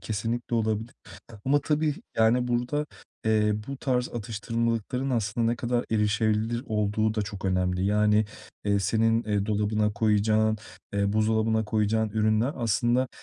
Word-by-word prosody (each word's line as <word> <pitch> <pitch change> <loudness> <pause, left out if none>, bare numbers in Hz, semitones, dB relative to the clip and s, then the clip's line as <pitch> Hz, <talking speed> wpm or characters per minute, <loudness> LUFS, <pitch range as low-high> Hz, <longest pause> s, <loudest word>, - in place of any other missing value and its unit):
kesinlikle 115 +3 -3
olabilir 110 +1 -1 0.5
ama 145 +2 +3
tabii, 150 0 0 0.2
yani, 120 +3 +3
burada, 125 +5 -1 0.4
eee, 105 -1 +3
bu 140 - -4
tarz 125 -2 0
atıştırmalıkların 115 +3 -2
aslında 115 -1 0
ne 115 +1 +1
kadar 120 0 -1
erişebilir 110 +2 +1
olduğu 110 -1 0
da 105 - 0
çok 100 -2 -7
önemli. 90 -1 0
Yani, 105 +1 +3 0.4
eee, 100 -1 +2
senin, 115 +4 +2
eee, 105 -2 0
dolabına 105 0 +1
koyacağın, 110 +1 +2 0.4
eee, 100 0 +1
buzdolabına 110 +1 +2
koyacağın 110 +1 +1
ürünler 110 +4 +1
aslında 120 +2 +1
110 Hz, 130 wpm, -27 LUFS, 105-120 Hz, 0.5 s, ama